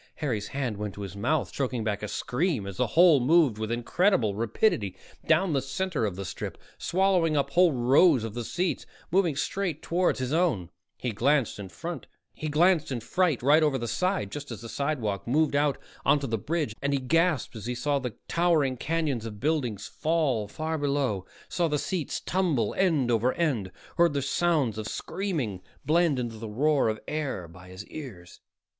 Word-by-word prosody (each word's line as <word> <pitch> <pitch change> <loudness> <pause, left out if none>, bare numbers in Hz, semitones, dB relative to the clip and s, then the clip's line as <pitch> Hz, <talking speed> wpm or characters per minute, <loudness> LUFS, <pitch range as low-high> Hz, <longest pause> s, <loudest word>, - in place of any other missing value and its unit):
Harry's 115 -9 -2
hand 130 -6 -3
went 105 -1 -4
to 105 - -7
his 95 -1 -7
mouth, 145 +9 0
choking 125 -4 -2
back 105 -2 -2
a 105 - -3
scream 135 - -1
as 100 -2 -7
the - - +1
hole 170 -5 +7
moved 135 -4 +3
with 110 0 -3
incredible 120 - +2
rapidity 110 - 0 0.3
down 170 +1 +3
the 135 - +2
center 140 - -1
of 95 - -4
the 100 +1 -5
strip, - - -5 0.2
swallowing 180 -4 +2
up 140 0 0
whole 175 +2 +5
rows 130 +2 +4
of 115 -2 -4
the 120 +1 -4
seats, 175 +10 -2 0.2
moving 175 -4 +2
straight 170 +1 -2
toward 175 +1 +1
his 130 +2 -2
own. 140 - +1 0.3
He 125 - -2
glanced 125 +2 +1
in 100 - -6
fright 165 - -6 1.4
over 150 -1 +4
the 120 -2 -4
side 185 - -1
just 145 -1 -6
as 115 -4 -7
the 115 - -8
sidewalk 125 -10 -2
moved 150 +3 +2
out 145 -1 +2 0.3
onto 145 -1 +3
the 115 -4 -1
"bridge," 150 -3 -2
and 140 +1 0
he 140 - +2
gasped 160 +1 +1
as 110 0 -7
he 125 - -2
saw 140 +3 0
the 125 -5 -5
towering 160 -7 +2
canyons 145 -6 -1
of 105 -2 -8
buildings 125 -8 -1
fall 140 -4 0
far 155 +8 -3
below, 140 -10 0 0.2
saw 175 -2 0
the 150 -1 0
seats 165 +1 -2
tumble 160 - 0
end 155 -10 +2
over 120 +2 +2
end, 130 - -1 0.3
heard 170 -3 +4
the 140 -1 -1
sounds 140 -6 +1
of 110 - -4
screaming 150 - -3 0.2
blend 165 -2 +3
into 120 -3 -3
the 110 -1 -6
roar 140 +3 +2
of 110 0 -2
air 140 - -3
by 90 +2 -14
his 95 +3 -9
ears. 110 - -10
140 Hz, 180 wpm, -27 LUFS, 110-160 Hz, 1.4 s, hole